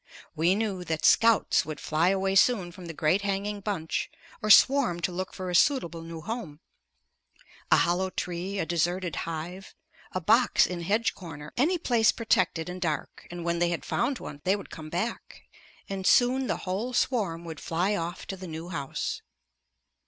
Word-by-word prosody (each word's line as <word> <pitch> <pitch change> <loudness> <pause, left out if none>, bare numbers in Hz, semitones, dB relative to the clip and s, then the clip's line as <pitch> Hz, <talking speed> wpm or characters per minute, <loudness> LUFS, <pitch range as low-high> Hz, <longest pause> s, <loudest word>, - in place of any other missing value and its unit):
We 170 +4 +3
knew 200 -4 -2
that 160 -2 -2
"scouts" 230 -1 +4
would 155 -2 -6
fly 160 +3 +1
away 195 0 +1
soon 195 -3 +3
from 180 0 -11
the 165 - -6
great 160 +6 +2
hanging 200 +1 -2
bunch 190 -6 -2 0.3
or 215 - -2
swarm 245 -5 +6
to 180 - 0
look 185 +1 -4
for 185 -1 -5
a - - -4
suitable 175 - +2
new 165 0 -8
home; 205 -8 -6 1.1
a - - +6
hollow 180 +2 +1
tree, 180 +2 -4
a 195 - 0
deserted 175 +2 -1
hive, 170 +4 -6 0.4
a 185 - -2
box 235 +8 +4
in 180 -1 -4
hedge 210 +7 +1
corner, 150 -5 -10
any 325 +9 +2
place 235 -8 +3
protected 185 -7 +1
and 180 +1 -6
dark, 155 -5 -3
and 175 -1 -7
when 170 0 0
they 175 0 +2
had 170 - -3
found 270 -1 0
one, 145 -9 -9
they 190 +2 +3
would 200 - -9
come 155 -2 -8
back, 190 +8 -4 0.4
and 190 -1 -3
soon 255 +1 +4
the - - -1
whole 205 +7 -2
swarm 200 -10 0
would 160 -3 -7
fly 180 +5 0
off 170 0 -4
to 195 - -5
the 185 -1 -9
new 160 +1 -7
house. 140 -6 -4
185 Hz, 180 wpm, -27 LUFS, 165-205 Hz, 1.1 s, swarm